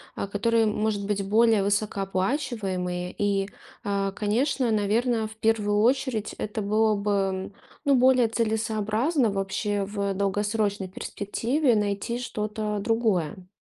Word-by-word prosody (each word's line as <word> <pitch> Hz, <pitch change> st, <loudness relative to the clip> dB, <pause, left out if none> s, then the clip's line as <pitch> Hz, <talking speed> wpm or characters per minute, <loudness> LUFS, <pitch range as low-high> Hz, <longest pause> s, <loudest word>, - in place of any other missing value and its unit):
а, -, -, -3 dB
которые, 225 Hz, +3 st, +2 dB
может 210 Hz, -1 st, 0 dB
быть, 200 Hz, -1 st, -1 dB
более 220 Hz, 0 st, +4 dB
высокооплачиваемые. 195 Hz, -2 st, -1 dB
И, 200 Hz, -1 st, 0 dB, 0.3 s
а, 200 Hz, -1 st, -1 dB
конечно, 235 Hz, +4 st, 0 dB
наверно, 220 Hz, +2 st, +1 dB
в 220 Hz, -, -12 dB
1 215 Hz, -2 st, +1 dB
очередь 250 Hz, -3 st, +1 dB
это 210 Hz, +1 st, -3 dB
было 215 Hz, +2 st, +2 dB
бы, 210 Hz, -1 st, +1 dB
м, 195 Hz, -1 st, -1 dB, 0.3 s
ну, 280 Hz, -1 st, +4 dB
более 255 Hz, -1 st, +5 dB
целесообразно 220 Hz, +3 st, 0 dB
вообще 200 Hz, +1 st, -1 dB
в 200 Hz, 0 st, -2 dB
долгосрочной 205 Hz, 0 st, 0 dB
перспективе 235 Hz, +8 st, -1 dB
найти 210 Hz, +3 st, -1 dB
что-то 210 Hz, -2 st, -3 dB
другое. 200 Hz, -6 st, 0 dB
210 Hz, 120 wpm, -26 LUFS, 200-225 Hz, 0.3 s, более